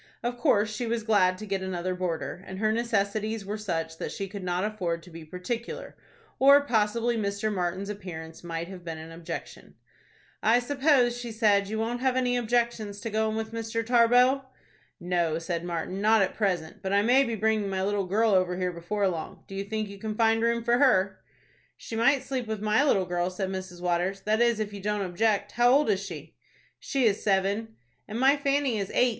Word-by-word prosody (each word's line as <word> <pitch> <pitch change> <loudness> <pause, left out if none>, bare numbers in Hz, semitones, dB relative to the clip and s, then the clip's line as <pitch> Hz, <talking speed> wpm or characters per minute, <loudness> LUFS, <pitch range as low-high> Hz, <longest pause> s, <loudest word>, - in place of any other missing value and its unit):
Of 245 0 -3
course 215 -7 +2
she 240 +2 -3
was 230 -1 -1
glad 185 -4 +3
to 215 - -7
get 195 -2 -2
another 185 -1 -2
boarder, 180 0 -3
and 190 - -7
her 215 +2 +1
necessities 220 -2 -1
were 205 +2 -3
such 165 -5 -3
that - - -4
she 195 - -4
could 195 0 -7
not 180 0 -1
afford 180 -6 -2
to 180 - -14
be 165 0 -9
particular, 180 +9 -5 0.4
or 280 +2 +7
possibly 235 0 +1
Mr. 205 0 -1
Martin's 185 +1 -2
appearance 175 -6 -7
might 170 0 -4
have 185 -1 -10
been 165 -2 -5
an 160 +1 -9
objection. 165 0 -8 0.7
"I 225 +2 +4
suppose," 260 -1 +2
she 245 -1 -6
said, 205 -3 +2
"you 220 - -2
won't 230 +2 -1
have 260 0 +1
any 250 -1 +1
objection 235 -2 0
to 205 +3 -6
go 220 +1 +1
in 215 - -3
with 220 0 -3
Mr. 230 0 -3
Tarbox." 245 +3 +4 0.6
"No," 175 -3 0
said 170 0 -3
Martin, 175 +2 -3
"not 215 0 +5
at 190 - -2
present; 180 -7 -2
but 190 - -3
I 200 0 +4
may 255 +5 +5
be 235 -4 -2
bringing 215 -1 +1
my 190 -1 -1
little 200 -1 0
girl 215 +4 +2
over 185 -2 +2
here 180 -1 -1
before 195 +4 -1
long. 165 -4 -5
Do - - -10
you 195 +1 -3
think 215 +1 -3
you 200 0 -10
can 215 +1 -4
find 225 0 +3
room 235 0 +1
for 240 +1 +2
her?" 195 -9 +3 0.6
"She 225 - -7
might 255 +4 +3
sleep 260 -3 -3
with 220 -1 -3
my 215 +5 +2
little 195 -10 +3
girl," 175 0 -1
said 185 +1 -3
Mrs. 185 -2 -6
Waters; 180 +2 0
"that 215 +3 +1
is, 235 -2 +3
if 210 -1 -3
you 200 - -7
don't 210 0 -1
object. 205 +2 0
How 240 +1 +4
old 280 -3 +4
is 195 0 -1
she?" - - -8 0.5
"She 270 -4 0
is 205 -2 +2
seven." 200 +3 0 0.3
"And 220 - -4
my 270 +2 +5
Fanny 280 -5 0
is 195 - -3
eight. 250 - +4
210 Hz, 210 wpm, -27 LUFS, 185-230 Hz, 0.7 s, or